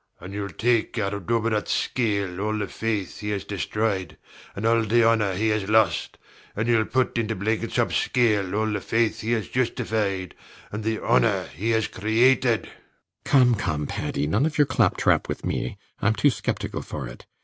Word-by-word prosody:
SIR - - -49
PATRICK. - - -15
And 95 - -8
youll 100 0 -3
take 120 0 +1
out 100 -2 -1
of 100 -4 -6
Dubedat's 115 -2 0
scale 100 -6 -1
all 110 +1 -1
the 105 -1 -2
faith 105 -4 -3
he 105 - -4
has 100 -2 -2
destroyed 100 -1 -2 0.4
and 100 - -4
the 115 0 +3
honor 105 -4 +2
he 110 +4 +1
has 105 -2 -1
lost, 110 -5 +2 0.4
and 110 +3 -1
youll 115 -2 +3
put 130 -1 0
into 110 -1 -1
Blenkinsop's 110 +3 0
scale 105 -6 +1
all 110 +1 +1
the 105 -2 -2
faith 115 -1 0
he 115 +2 0
has 110 -3 -1
justified 110 -7 -1 0.4
and 105 +1 -4
the 110 0 0
honor - - +2
he 105 +9 -2
has 110 -1 +2
created. 115 +3 +2
RIDGEON. - - -12 0.6
Come 125 -3 +5
come, 80 -9 -1
Paddy! 70 - -2
none 110 - +2
of 160 0 -5
your 145 - +5
claptrap - - +2
with - - -4
me: 65 - -2 0.2
I'm 110 +1 +2
too 145 - +4
sceptical - - -3
for 65 - -6
it. - - -12
110 Hz, 185 wpm, -24 LUFS, 100-115 Hz, 0.6 s, Come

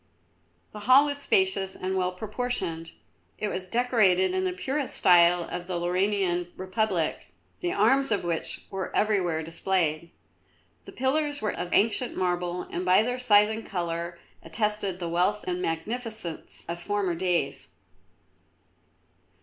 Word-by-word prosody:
The 210 - -8
hall 270 +3 +8
was 285 -1 -2
spacious 190 -6 +1
and 190 +1 -3
well 180 -1 0
proportioned. 185 -5 -4 0.4
It 210 - -2
was 185 -1 -4
decorated 195 -6 +3
in 185 0 0
the 185 - 0
purest 265 +10 -2
style 175 -1 +5
of 175 +1 -6
the 180 -2 -2
Lauranian 180 0 0
Republic, 185 -3 -1 0.3
the 355 -1 -1
arms 265 +7 +3
of 205 - +1
which 170 -2 -3
were 190 -1 -3
everywhere 180 -7 +1
displayed. 165 -1 -1 0.8
The - - -9
pillars 290 +3 0
were 215 - -1
of 175 - -5
ancient 230 +4 +1
marble 180 -1 -1
and 180 - -3
by 185 +3 +5
their 250 +2 -2
size 210 -4 +5
and 220 +1 -4
colour 170 -1 -4 0.2
attested 205 +2 -1
the 175 -2 -4
wealth 180 +5 0
and 180 0 -2
magnificence 215 +1 -4
of 170 +1 -4
former 200 -1 -1
days. 170 -4 -1
185 Hz, 140 wpm, -27 LUFS, 175-220 Hz, 0.8 s, hall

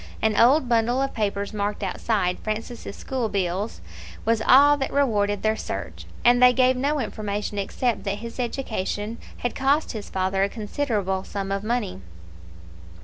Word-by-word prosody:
An 220 -1 +1
old 255 +5 +5
bundle 240 +1 +2
of 275 0 -1
papers 205 -2 -2
marked 205 0 -2
outside, 185 -1 0
"Francis' 220 0 -5
school 255 -4 -2
bills, 195 +1 -1
&c." - - -16 0.4
was 225 0 +2
all 285 +5 +7
that 270 - -2
rewarded 205 -7 +1
their 220 0 +2
search, - - -6 0.2
and 245 +1 +6
they 250 0 +8
gave 255 0 +4
no 285 +4 0
information 210 -3 -3
except 215 +1 -1
that 200 0 -1
his 230 +3 -8
education 225 -3 -3 0.2
had 245 - -2
cost 280 +4 +1
his 215 -4 -7
father 190 0 0
a 200 - +2
considerable 210 -4 -2
sum 195 -1 -4
of 200 0 -1
money. 215 - -2
220 Hz, 160 wpm, -24 LUFS, 200-250 Hz, 0.4 s, they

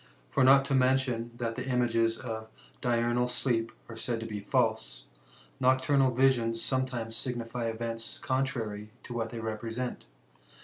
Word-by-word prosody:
For 135 - +3
not 135 +1 +7
to 140 - -1
mention 130 -3 +2
thai 115 -1 -1
the 125 +3 -5
images 115 -2 +2
of 110 -3 -5 0.3
diurnal 120 0 +2
sleep 120 -2 0 0.2
are 115 - -8
said 115 +1 -2
to - - -4
be 105 -2 -4
false, - - 0 0.6
ftdcturnal 130 0 +3
visions 120 -4 +3
sometimes 125 -3 -1
signify 120 -1 -2
events 115 0 -4
contrary 120 -6 -2
to 120 - -7
what 115 -1 -2
they 115 - -6
represent. 115 +3 -4
120 Hz, 140 wpm, -30 LUFS, 115-130 Hz, 0.6 s, not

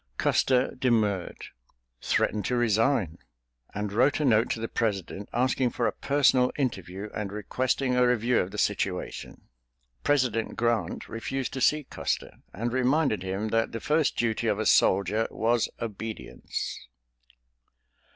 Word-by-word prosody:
Custer 130 -1 +2
demurred—threatened 95 - -2
to 125 - 0
resign—and 100 - -2
wrote 130 +8 +3
a 150 - +1
note 115 -2 +3
to - - -2
the 115 - -3
President 100 -4 -2
asking 125 +1 +1
for 120 - -2
a - - +2
personal 135 -3 +3
interview 100 - -3
and 105 -2 -4
requesting 125 +5 -1
a 125 0 +4
review 125 0 +2
of 90 - -1
the - - -8
situation. - - -2 0.6
President 125 -6 +1
Grant 115 -1 -1
refused 130 +3 -4
to 130 - -4
see 150 +3 +3
Custer, - - -4
and 115 +5 -3
reminded 130 - +2
him 95 +3 -3
that 115 +1 0
the 115 - -3
first 150 +2 +1
duty 115 0 0
of 105 - +1
a 110 - -2
soldier 100 +4 +3
was 115 +1 +1
obedience. 110 - -5
115 Hz, 130 wpm, -27 LUFS, 100-125 Hz, 0.6 s, a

